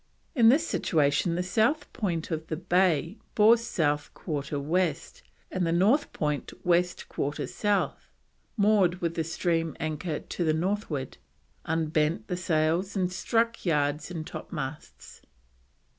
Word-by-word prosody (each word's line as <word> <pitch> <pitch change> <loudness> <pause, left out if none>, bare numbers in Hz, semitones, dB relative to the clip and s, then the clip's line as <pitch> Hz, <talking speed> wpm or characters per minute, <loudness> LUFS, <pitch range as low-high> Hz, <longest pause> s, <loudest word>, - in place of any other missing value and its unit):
In 235 -7 +6
this 300 +7 +4
situation 155 - +1
the 180 - 0
South 220 +11 +1
point 175 -7 -2
of 160 0 -3
the 160 - -2
bay 180 0 +1 0.2
bore 220 +2 +7
South 155 -10 -1
1/4 145 -3 -3
West, 165 +2 -1 0.3
and 185 - -1
the 165 - +1
North 210 - +3
point 150 -2 -2
West 180 0 +2
1/4 145 +1 -2
South. 205 -1 -1 0.5
Moored 200 -4 +3
with 170 -2 -1
the 165 - -1
stream 165 -1 -1
anchor 155 +1 -3
to 175 - -4
the 155 -1 +2
Northward. 170 - -2 0.5
Unbent 155 0 0
the 180 - 0
sails 170 +3 0
and 185 -2 0
struck 230 +4 0
yards 150 -2 0
and 165 -3 -5
topmasts. 150 -4 -7
170 Hz, 135 wpm, -28 LUFS, 155-190 Hz, 0.5 s, bore